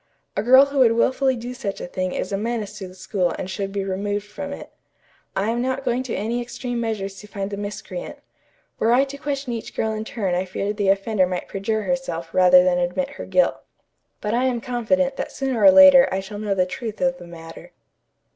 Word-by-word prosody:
A -, -, +1 dB
girl 260 Hz, +5 st, +7 dB
who 280 Hz, 0 st, -3 dB
would 235 Hz, -3 st, +6 dB
wilfully 260 Hz, +3 st, +2 dB
do 245 Hz, +1 st, -6 dB
such 230 Hz, -6 st, -5 dB
a -, -, -5 dB
thing 185 Hz, +1 st, -3 dB
is 185 Hz, -, -3 dB
a 195 Hz, -, 0 dB
menace 215 Hz, -2 st, -3 dB
to 190 Hz, -, -6 dB
the 185 Hz, -, -13 dB
school 185 Hz, -2 st, -1 dB
and 185 Hz, -, -4 dB
should 195 Hz, +1 st, -4 dB
be 200 Hz, 0 st, -2 dB
removed 200 Hz, +2 st, -2 dB
from 280 Hz, +8 st, -7 dB
it. 280 Hz, -, -8 dB, 0.6 s
I 205 Hz, +4 st, 0 dB
am 240 Hz, +1 st, -1 dB
not 260 Hz, +2 st, -2 dB
going 245 Hz, 0 st, +1 dB
to 255 Hz, -2 st, -4 dB
any 230 Hz, +4 st, -2 dB
extreme 240 Hz, 0 st, -4 dB
measures 200 Hz, -4 st, -3 dB
to 210 Hz, -, -12 dB
find 200 Hz, -1 st, -5 dB
the 200 Hz, -, -4 dB
miscreant. 205 Hz, -, -6 dB, 0.6 s
Were 230 Hz, +2 st, +3 dB
I 260 Hz, +2 st, +5 dB
to 280 Hz, 0 st, -6 dB
question 280 Hz, -3 st, -3 dB
each 230 Hz, -, -6 dB
girl 220 Hz, -, 0 dB
in 215 Hz, 0 st, -3 dB
turn 210 Hz, -5 st, -2 dB
I 180 Hz, +1 st, 0 dB
fear 195 Hz, +2 st, -3 dB
the 205 Hz, -2 st, 0 dB
offender 195 Hz, -1 st, +2 dB
might 180 Hz, -1 st, -4 dB
perjure 215 Hz, +2 st, -2 dB
herself 185 Hz, -11 st, -3 dB
rather 180 Hz, -1 st, +7 dB
than 180 Hz, -1 st, +2 dB
admit 180 Hz, +11 st, -1 dB
her -, -, -8 dB
guilt. -, -, +2 dB, 0.6 s
But 210 Hz, +1 st, -2 dB
I 245 Hz, +2 st, +2 dB
am 250 Hz, -2 st, 0 dB
confident 265 Hz, +3 st, 0 dB
that -, -, -4 dB
sooner 265 Hz, -4 st, -2 dB
or 290 Hz, -, +10 dB
later 280 Hz, -2 st, +8 dB
I 190 Hz, -, 0 dB
shall 205 Hz, +2 st, -7 dB
know 205 Hz, -2 st, -1 dB
the 185 Hz, -1 st, +2 dB
truth 220 Hz, +3 st, -6 dB
of 265 Hz, 0 st, 0 dB
the 175 Hz, -, -11 dB
matter." 165 Hz, -1 st, -11 dB
220 Hz, 225 wpm, -22 LUFS, 195-255 Hz, 0.6 s, or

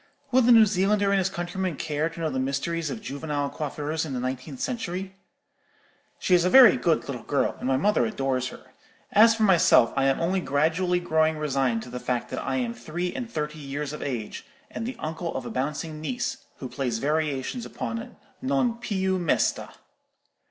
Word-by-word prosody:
(Will 260 Hz, +1 st, +5 dB
the 245 Hz, 0 st, +5 dB
New 225 Hz, -2 st, +8 dB
Zealander 200 Hz, 0 st, +2 dB
and 200 Hz, -, +3 dB
his 190 Hz, 0 st, +1 dB
countrymen 180 Hz, -1 st, -3 dB
care 155 Hz, +2 st, -1 dB
to 165 Hz, -, -11 dB
know 160 Hz, -2 st, -1 dB
the 130 Hz, -, -2 dB
mysteries 140 Hz, +5 st, -1 dB
of 225 Hz, -2 st, -6 dB
juvenile 145 Hz, -3 st, -3 dB
coiffures 150 Hz, +1 st, -3 dB
in 150 Hz, -4 st, -5 dB
the 125 Hz, -, -2 dB
nineteenth 130 Hz, +2 st, -4 dB
century?) 190 Hz, -5 st, -4 dB, 1.0 s
She 185 Hz, -, 0 dB
is 175 Hz, -1 st, +5 dB
a 180 Hz, -, +2 dB
very 250 Hz, -1 st, +9 dB
good 165 Hz, -2 st, +1 dB
little 125 Hz, -4 st, -5 dB
girl, 140 Hz, +5 st, 0 dB
and -, -, -3 dB
my 130 Hz, 0 st, +2 dB
mother 210 Hz, +9 st, +2 dB
adores 135 Hz, -, -1 dB
her. -, -, -12 dB, 0.4 s
As 225 Hz, +2 st, +6 dB
for 225 Hz, -, 0 dB
myself, 175 Hz, -, +5 dB
I 135 Hz, -1 st, +2 dB
am 135 Hz, 0 st, +2 dB
only 185 Hz, +3 st, +1 dB
gradually 165 Hz, +5 st, +1 dB
growing 160 Hz, -2 st, +1 dB
resigned 135 Hz, -6 st, 0 dB
to 125 Hz, -, -11 dB
the 125 Hz, -, -5 dB
fact 125 Hz, -1 st, -2 dB
that -, -, -3 dB
I 135 Hz, -, -2 dB
am 120 Hz, -3 st, -1 dB
three 155 Hz, +10 st, -4 dB
and 245 Hz, -3 st, -5 dB
thirty 150 Hz, -5 st, -4 dB
years 145 Hz, +1 st, -4 dB
of 150 Hz, -, -7 dB
age, 120 Hz, -6 st, -4 dB, 0.3 s
and 225 Hz, -, -4 dB
the 255 Hz, -, -4 dB
uncle 165 Hz, -1 st, -4 dB
of 130 Hz, -, -4 dB
a -, -, -5 dB
bouncing 150 Hz, +4 st, -3 dB
niece, 255 Hz, +8 st, -3 dB
who 130 Hz, -, -7 dB
plays 125 Hz, -3 st, -2 dB
variations 150 Hz, -, -1 dB
upon 230 Hz, +2 st, -5 dB, 0.3 s
'Non 260 Hz, -3 st, 0 dB
più 190 Hz, -5 st, 0 dB
mesta.' 170 Hz, -3 st, +1 dB
160 Hz, 195 wpm, -26 LUFS, 135-190 Hz, 1.0 s, very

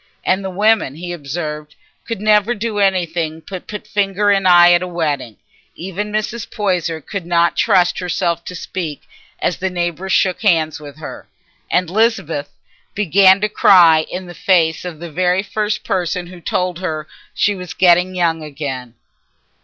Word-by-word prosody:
And 190 Hz, +1 st, +1 dB
the 190 Hz, -, -3 dB
women, 205 Hz, -6 st, +2 dB
he 175 Hz, +2 st, -6 dB
observed, 150 Hz, -1 st, -6 dB, 0.3 s
could 230 Hz, -4 st, -3 dB
never 210 Hz, +2 st, +3 dB
do 215 Hz, -1 st, -3 dB
anything 170 Hz, -5 st, 0 dB
but 185 Hz, -2 st, -7 dB
put 210 Hz, 0 st, -7 dB
finger 205 Hz, 0 st, +1 dB
in 195 Hz, -2 st, +2 dB
eye 175 Hz, -1 st, +7 dB
at 175 Hz, 0 st, +4 dB
a 180 Hz, -, -3 dB
wedding. 150 Hz, -, -3 dB, 0.4 s
Even 195 Hz, +4 st, -5 dB
Mrs. 215 Hz, +2 st, -3 dB
Poyser 180 Hz, -6 st, -1 dB
could 200 Hz, +5 st, -6 dB
not 170 Hz, -1 st, +2 dB
trust 175 Hz, -1 st, +2 dB
herself 175 Hz, -1 st, -1 dB
to 180 Hz, -, -7 dB
speak 165 Hz, -4 st, -5 dB, 0.4 s
as 180 Hz, -, -1 dB
the 190 Hz, -, -2 dB
neighbours 175 Hz, +1 st, -3 dB
shook 185 Hz, -2 st, +2 dB
hands 160 Hz, -7 st, +2 dB
with 145 Hz, -1 st, -11 dB
her, 155 Hz, -, -9 dB, 0.4 s
and 180 Hz, -1 st, +1 dB
Lisbeth 175 Hz, -7 st, 0 dB, 0.5 s
began 195 Hz, 0 st, +5 dB
to 210 Hz, -, +2 dB
cry 170 Hz, -6 st, +5 dB
in 185 Hz, +1 st, -5 dB
the 175 Hz, -, -10 dB
face 170 Hz, -3 st, +1 dB
of 175 Hz, -3 st, -6 dB
the 170 Hz, -1 st, -8 dB
very 180 Hz, +3 st, +1 dB
first 210 Hz, 0 st, -2 dB
person 180 Hz, -1 st, -2 dB
who 175 Hz, 0 st, -12 dB
told 180 Hz, 0 st, -2 dB
her 155 Hz, -4 st, -4 dB, 0.3 s
she 205 Hz, -, +2 dB
was 180 Hz, -3 st, -8 dB
getting 180 Hz, 0 st, +4 dB
young 165 Hz, -2 st, 0 dB
again. 135 Hz, -5 st, -6 dB
180 Hz, 165 wpm, -18 LUFS, 165-195 Hz, 0.5 s, eye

